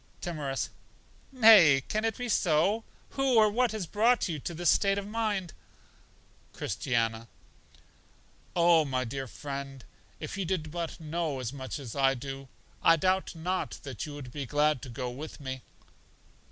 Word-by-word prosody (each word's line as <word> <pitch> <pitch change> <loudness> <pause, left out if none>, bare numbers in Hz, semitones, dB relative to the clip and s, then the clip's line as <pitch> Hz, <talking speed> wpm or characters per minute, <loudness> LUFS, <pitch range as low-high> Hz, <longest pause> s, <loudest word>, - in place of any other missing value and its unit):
Timorous: 150 -6 -3 0.6
Nay, 210 - +7
can 215 +1 -1
it 225 -2 -1
be 245 - -3
so? 195 +2 +2 0.3
Who 270 -2 +1
or 215 -2 +6
what 245 +2 +2
has 215 -4 -3
brought 225 +7 +2
you 160 -4 -3
to 170 +5 -5
this 175 0 +3
state 195 0 +2
of 200 - -3
mind? 210 -5 -2 1.0
Christiana: 115 +1 -1 1.3
Oh, 170 -2 +5
my 130 -3 -1
friend, 135 +1 -6 0.3
if 200 - -6
you - - 0
did 160 -4 -2
but 170 -1 -4
know 160 -3 -2
as 125 0 -4
much 130 +1 -5
as 130 -6 -8
I 135 -1 +3
do, 135 +1 -7 0.3
I 165 - +6
doubt 185 +2 0
not 180 +3 -2
that 135 0 -6
you 145 - -7
would 130 -4 -8
be 140 -1 -5
glad 150 -1 +2
to 130 - -8
go 125 +1 -4
with 150 +6 -8
me. 130 -2 -5
155 Hz, 155 wpm, -29 LUFS, 135-195 Hz, 1.3 s, Nay